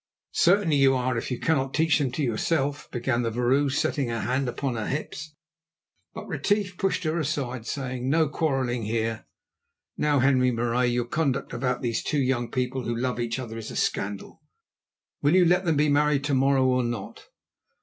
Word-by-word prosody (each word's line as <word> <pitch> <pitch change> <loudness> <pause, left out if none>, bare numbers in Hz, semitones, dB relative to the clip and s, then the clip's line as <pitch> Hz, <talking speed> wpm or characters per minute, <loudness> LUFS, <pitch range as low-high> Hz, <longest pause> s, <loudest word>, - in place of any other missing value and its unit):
"Certainly 175 -4 +3
you 135 -1 +5
are, 130 0 0
if 115 - -3
you 125 - -3
cannot 135 -4 0
teach 160 0 +3
them 135 -4 0
to 150 - -1
yourself," 140 +4 -1
began 120 -1 -1
the 115 - 0
vrouw, 125 +5 +1
setting 135 0 0
her 115 -1 -2
hands 130 +3 0
upon 130 0 -3
her 110 -2 -3
hips. 155 +2 -5 0.8
But - - -7
Retief 205 -3 0
pushed 190 -1 -1
her 160 +1 0
aside, 130 -6 -3
saying: 130 -1 -3
"No 160 +2 +3
quarrelling 135 -6 -1
here. 115 0 -2 0.7
Now, 150 -1 +2
Henri 130 -1 +3
Marais, 120 +1 +1
your 120 0 0
conduct 140 +1 -1
about 125 +1 -2
these 115 -2 -1
two 150 - -2
young 125 -3 0
people 130 +1 -2
who 120 - -1
love 125 +1 -2
each 120 0 -2
other 115 -3 -6
is 110 - -7
a - - -8
scandal. 100 0 -3 0.8
Will 145 +5 +3
you 185 -1 +6
let 180 +2 +3
them 160 -3 +2
be 150 +1 +3
married 145 -1 +2
to 145 -1 -1
morrow 135 0 +3
or 125 -1 +2
not?" 120 -4 -5
130 Hz, 185 wpm, -26 LUFS, 120-150 Hz, 0.8 s, you